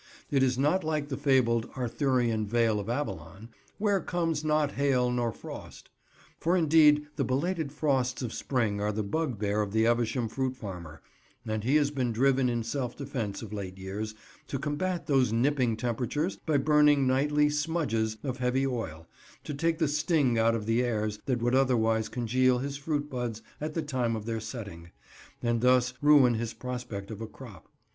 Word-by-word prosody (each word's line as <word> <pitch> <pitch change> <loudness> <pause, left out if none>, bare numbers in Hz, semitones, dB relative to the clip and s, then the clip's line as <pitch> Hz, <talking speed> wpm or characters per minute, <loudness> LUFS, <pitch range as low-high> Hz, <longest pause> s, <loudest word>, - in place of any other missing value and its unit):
It 140 -2 +3
is 130 -1 +2
not 150 +8 +2
like 155 -2 -2
the 135 - -2
fabled 130 -5 +2
Arthurian 120 -3 0
Vale 115 -1 +2
of 100 +2 -5
Avalon, 105 - -4 0.3
"where 205 -2 +1
comes 165 -3 -1
not 150 -2 +2
hail 130 -4 +1
nor 120 -1 0
frost"; - - -10 0.5
for 175 +3 +2
indeed 150 -2 +5
the - - +1
belated 155 +3 -1
frosts 135 -4 0
of 120 - -4
spring 110 -6 -1
are 105 +1 0
the 105 +1 -2
bugbear 105 -5 -1
of 105 -1 -3
the 110 0 +3
Evesham 120 0 +1
fruit 130 +3 -2
farmer, 85 -8 -8 0.4
and 110 -1 -2
he 130 +6 +2
has 145 -2 +3
been 130 -4 -1
driven 130 +2 +2
in 120 -1 -1
self 120 +1 -3
defence 125 -8 -4
of 110 -1 -8
late 95 -3 -5
years, 105 +3 -5 0.3
to 135 - -3
combat 150 +6 -2
those 135 -6 +2
nipping 125 -1 +1
temperatures 125 - -1
by 155 -2 +3
burning 150 -1 +4
nightly 145 +3 +3
"smudges" 150 -8 -1
of 130 -3 -3
heavy 130 +1 +1
oil, 80 - -4 0.4
to 150 - -5
take 165 +3 0
the 160 - +1
sting 150 -3 +2
out 115 0 +3
of 110 -2 -3
the 115 +2 +2
airs 110 -3 -1
that 125 -3 0
would 120 +1 +1
otherwise 115 -4 +2
congeal 125 +1 +2
his 140 +2 -3
fruit 145 0 -2
buds 120 -5 -4 0.2
at 155 0 -4
the 165 - -1
time 125 -6 -1
of 110 -1 -5
their 115 -1 -2
setting, 100 -8 -8 0.5
and 120 -1 +1
thus 125 0 +3
ruin 145 -4 +6
his 115 0 -3
prospect 120 -5 -6
of 110 0 -7
a 110 - -4
crop. 105 - -13
125 Hz, 180 wpm, -29 LUFS, 115-145 Hz, 0.5 s, ruin